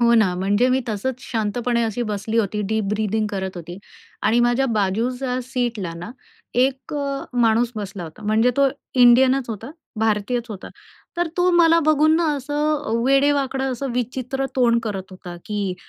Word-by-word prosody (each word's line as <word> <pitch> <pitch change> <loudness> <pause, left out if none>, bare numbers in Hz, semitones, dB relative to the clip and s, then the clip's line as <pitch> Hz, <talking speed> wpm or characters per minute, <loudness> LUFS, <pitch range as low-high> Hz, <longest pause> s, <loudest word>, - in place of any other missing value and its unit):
हो 235 0 +4
ना, 215 -6 +3
म्हणजे 205 +6 +2
मी 260 +1 +2
तसंच 235 +4 -3
शांतपणे 235 +1 -1
अशी 225 +2 -2
बसली 215 0 -2
होती, 210 -1 0
डीप 220 -1 0
ब्रीथिंग 215 0 0
करत 190 -2 -4
होती. 175 +1 -8 0.4
आणि 230 +3 +3
माझ्या 240 +3 +2
बाजूच्या 245 +6 -1
सीटला 240 -8 -3
ना 175 +6 -7 0.6
एक 270 +2 -6
अ, 280 -1 -3
माणूस 230 +1 +3
बसला 200 -3 -5
होता. 160 +6 -11
म्हणजे 220 +3 +3
तो 280 -1 +4 0.3
इंडियनच 255 +1 +5
होता, 220 +4 -6 0.3
भारतीयच 220 +2 0
होता. 205 -4 -8 0.5
तर 345 0 +1
तो 360 +1 +3
मला 335 -1 +5
बघून 310 +1 +4
ना 340 - +1
असं 280 +2 -6 0.3
अ, - - -4 0.2
वेडे-वाकडं, 275 -1 +2
असं 270 +2 -4
विचित्र 255 +2 -2
तोंड 235 -2 +4
करत 205 -4 -3
होता, 185 -1 -9
की 205 -3 -2
235 Hz, 160 wpm, -22 LUFS, 210-265 Hz, 0.6 s, इंडियनच